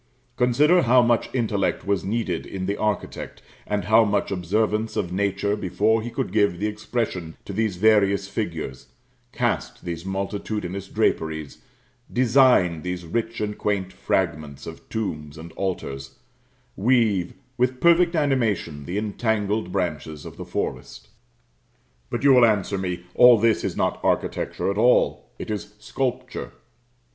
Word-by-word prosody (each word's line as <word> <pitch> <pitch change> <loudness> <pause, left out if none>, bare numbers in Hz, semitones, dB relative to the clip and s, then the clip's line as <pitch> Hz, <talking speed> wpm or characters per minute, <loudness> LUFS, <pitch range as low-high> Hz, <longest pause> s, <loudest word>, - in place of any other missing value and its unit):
Consider 145 +8 +4
how 125 -1 +5
much 120 -1 +2
intellect 105 -7 -1
was 100 -1 0
needed 100 -5 -2
in 95 -1 -5
the 100 +2 -1
architect, 105 -2 -3 0.2
and 105 -3 -1
how 110 +3 +6
much 105 -1 0
observance 105 +4 0
of 90 - -2
nature 100 +1 0
before 105 +3 +1
he 120 - -5
could - - -3
give 100 -5 +2
the 100 - -2
expression 105 -6 -3
to 100 - -6
these 110 -1 0
various 100 -1 +3
figures 85 - -4 0.4
cast - - -2
these 85 -1 -4
multitudinous 95 0 -4
draperies 80 -5 -1 0.5
design 120 - +4
these 90 +1 -4
rich 115 +5 -2
and 105 -1 -3
quaint 95 -3 -1
fragments 75 -1 -2
of 80 - -10
tombs 75 -9 -4
and 80 +1 -9
altars 70 -9 -4 0.6
weave 105 -5 +2 0.2
with 125 +1 0
perfect 170 0 +4
animation 115 - 0
the 90 +6 -3
entangled 105 -2 -1
branches 80 -5 -3
of - - -9
the - - -8
forest. - - -5 1.0
But - - -3
you 140 - +6
will 125 -1 +6
answer 100 -3 +1
me, 90 -2 -3
all 125 -1 +8
this 110 0 +2
is - - -3
not - - 0
architecture - - 0
at 100 - -3
all 120 - +3
it - - -6
is 105 0 -5
sculpture. 125 - -4
100 Hz, 140 wpm, -24 LUFS, 90-115 Hz, 1.0 s, all